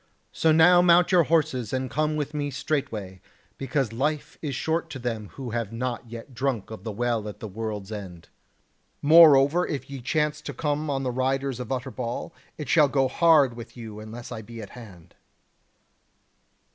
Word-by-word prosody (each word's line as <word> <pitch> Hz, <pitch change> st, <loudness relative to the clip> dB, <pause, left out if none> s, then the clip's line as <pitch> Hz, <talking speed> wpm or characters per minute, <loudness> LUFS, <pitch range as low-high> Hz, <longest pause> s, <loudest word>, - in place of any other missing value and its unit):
So 160 Hz, -, +2 dB
now 175 Hz, +3 st, +6 dB
mount 175 Hz, 0 st, +5 dB
your 175 Hz, -3 st, +5 dB
horses 145 Hz, -8 st, +1 dB
and 130 Hz, 0 st, -1 dB
come 155 Hz, +3 st, -1 dB
with 150 Hz, 0 st, -3 dB
me 145 Hz, -1 st, -2 dB
straightway; 110 Hz, -, -3 dB, 0.4 s
because 135 Hz, -4 st, -1 dB
life 150 Hz, +4 st, -2 dB
is 145 Hz, -4 st, -3 dB
short 165 Hz, +4 st, -1 dB
to 135 Hz, -, -6 dB
them 115 Hz, -4 st, -4 dB
who 130 Hz, -4 st, -6 dB
have 115 Hz, -3 st, -3 dB
not 120 Hz, 0 st, -4 dB
yet 115 Hz, +3 st, -9 dB
drunk 120 Hz, -4 st, -2 dB
of 110 Hz, -4 st, -8 dB
the 110 Hz, -, -4 dB
Well 115 Hz, 0 st, -1 dB
at 105 Hz, -, -10 dB
the 110 Hz, -, -6 dB
World's 105 Hz, 0 st, -5 dB
End. 95 Hz, -5 st, -8 dB, 0.8 s
Moreover 155 Hz, +1 st, +7 dB
if 140 Hz, -1 st, -5 dB
ye 135 Hz, -2 st, -6 dB
chance 150 Hz, +3 st, 0 dB
to -, -, -7 dB
come 150 Hz, 0 st, -1 dB
on 135 Hz, -1 st, -1 dB
the 130 Hz, -, -1 dB
riders 135 Hz, 0 st, -1 dB
of 125 Hz, 0 st, -6 dB
Utterbol, 130 Hz, +2 st, -4 dB, 0.2 s
it 150 Hz, -, -6 dB
shall 150 Hz, 0 st, +5 dB
go 135 Hz, -1 st, +2 dB
hard 155 Hz, -4 st, +4 dB
with 120 Hz, +1 st, -10 dB
you 110 Hz, -3 st, -8 dB
unless 115 Hz, +3 st, -9 dB
I 115 Hz, -2 st, -5 dB
be 115 Hz, +2 st, -10 dB
at 105 Hz, -3 st, -9 dB
hand." 100 Hz, -9 st, -13 dB
130 Hz, 180 wpm, -25 LUFS, 115-150 Hz, 0.8 s, Moreover